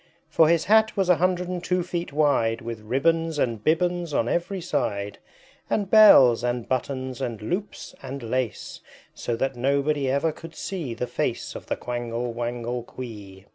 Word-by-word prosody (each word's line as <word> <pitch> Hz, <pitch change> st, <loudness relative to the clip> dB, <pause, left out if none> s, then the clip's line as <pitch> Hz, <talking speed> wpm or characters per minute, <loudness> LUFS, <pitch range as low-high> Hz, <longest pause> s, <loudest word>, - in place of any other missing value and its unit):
For 160 Hz, -1 st, +5 dB
his 165 Hz, -1 st, +2 dB
Hat 220 Hz, +1 st, +4 dB
was 190 Hz, -2 st, +1 dB
a 180 Hz, -, +5 dB
hundred 180 Hz, 0 st, +1 dB
and 180 Hz, -1 st, -4 dB
two 180 Hz, 0 st, 0 dB
feet 175 Hz, -1 st, -4 dB
wide, 140 Hz, -7 st, +2 dB
With 115 Hz, -1 st, -6 dB
ribbons 160 Hz, +8 st, 0 dB
and 115 Hz, -6 st, -1 dB
bibbons 175 Hz, -1 st, 0 dB
on 115 Hz, -, +1 dB
every 175 Hz, +7 st, -1 dB
side, 100 Hz, -, -2 dB, 0.5 s
And 200 Hz, -2 st, -1 dB
bells, 135 Hz, -, +8 dB
and 120 Hz, -1 st, -2 dB
buttons, 130 Hz, 0 st, -3 dB
and 115 Hz, -3 st, -3 dB
loops, 180 Hz, -, -4 dB
and 135 Hz, 0 st, -7 dB
lace, 125 Hz, 0 st, -3 dB, 0.3 s
So 120 Hz, -, -3 dB
that 135 Hz, +3 st, -2 dB
nobody 140 Hz, +2 st, 0 dB
ever 140 Hz, +4 st, +1 dB
could 165 Hz, +1 st, -12 dB
see 160 Hz, -12 st, -4 dB
the 125 Hz, -, -2 dB
face 125 Hz, -, -3 dB
Of -, -, -9 dB
the -, -, -1 dB
Quangle 120 Hz, 0 st, -4 dB
Wangle 120 Hz, +1 st, -3 dB
Quee. 105 Hz, -6 st, -10 dB
135 Hz, 170 wpm, -25 LUFS, 120-170 Hz, 0.5 s, bells